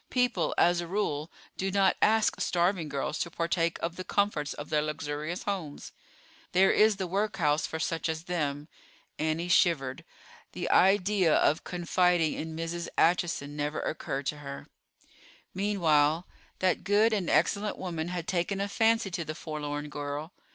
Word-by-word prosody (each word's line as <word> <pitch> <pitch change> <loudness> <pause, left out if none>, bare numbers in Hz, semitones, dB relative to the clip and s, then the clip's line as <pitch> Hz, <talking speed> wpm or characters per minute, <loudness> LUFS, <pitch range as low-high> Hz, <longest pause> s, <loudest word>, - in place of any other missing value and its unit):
People 250 -8 +1
as 175 0 +4
a 170 - -6
rule, 165 -5 -2 0.3
do 195 - -1
not 195 0 +3
ask 220 0 +3
starving 175 -2 +1
girls 140 +2 -3
to 170 - -2
partake 170 0 0
of 170 +1 -2
the 185 - -4
comforts 185 -7 0
of 145 +1 -8
their 150 -1 +3
luxurious 155 +2 -4
homes. 180 -8 -4 0.6
There 190 +2 +5
is 215 0 +4
the 190 -1 -3
workhouse 180 -5 0
for 160 - -4
such 165 0 -2
as 160 0 -3
them. 150 -4 -2 0.5
Annie 160 +2 -1
shivered. 145 -7 +2 0.5
The - - -3
idea 190 -2 +4
of 155 - +2
confiding 175 -2 +1
in 160 0 -5
Mrs. 165 +1 -4
Acheson 165 -4 +1
never 150 +1 -2
occurred 140 -3 -3
to 150 +2 -2
her. 140 -1 -8 0.9
Meanwhile, 170 -5 +2 0.3
that 185 -1 +1
good 215 +3 +3
and 195 -5 -1
excellent 200 +7 +1
woman 170 -3 -4
had 175 -1 -4
taken 185 +2 -1
a 200 - 0
fancy 225 0 +2
to 170 -1 -2
the 155 0 -6
forlorn 150 -2 -5
girl. 145 +3 -5
170 Hz, 155 wpm, -29 LUFS, 150-190 Hz, 0.9 s, There